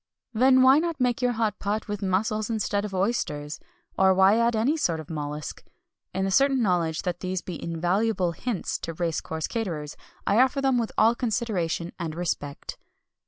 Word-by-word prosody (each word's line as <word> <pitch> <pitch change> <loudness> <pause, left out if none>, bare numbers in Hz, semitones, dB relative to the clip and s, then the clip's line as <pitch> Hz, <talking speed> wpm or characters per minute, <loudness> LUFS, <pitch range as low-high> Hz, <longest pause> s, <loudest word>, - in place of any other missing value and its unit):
Then 260 +3 +5
why 265 +3 +7
not 335 -2 -2
make 250 -1 +1
your 245 -1 +2
hot 220 -3 -1
pot 210 +3 -2
with 205 -1 -4
mussels 205 +3 0
instead 210 -2 -1
of 205 - -6
oysters? 160 -7 -1 0.4
Or 190 0 +5
why 190 +4 +5
add 235 0 +2
any 235 +8 +2
sort 170 - 0
of 160 +1 -9
mollusc? 150 -1 -5 0.5
In 190 +1 -1
the 195 - -1
certain 270 +5 +4
knowledge 170 -5 0
that 175 -2 -2
these 185 -1 -3
be 180 - -7
invaluable 180 +3 0
hints 205 +4 -3
to 165 - -5
race 165 -1 -1
course 160 -1 -4
caterers, 165 -10 -4 0.3
I 205 +3 +3
offer 265 +2 +2
them 265 -2 +2
with 230 - -2
all 225 +2 +5
consideration 210 -8 -2
and 160 -3 -4
respect. 155 -4 -4
200 Hz, 180 wpm, -26 LUFS, 170-235 Hz, 0.5 s, why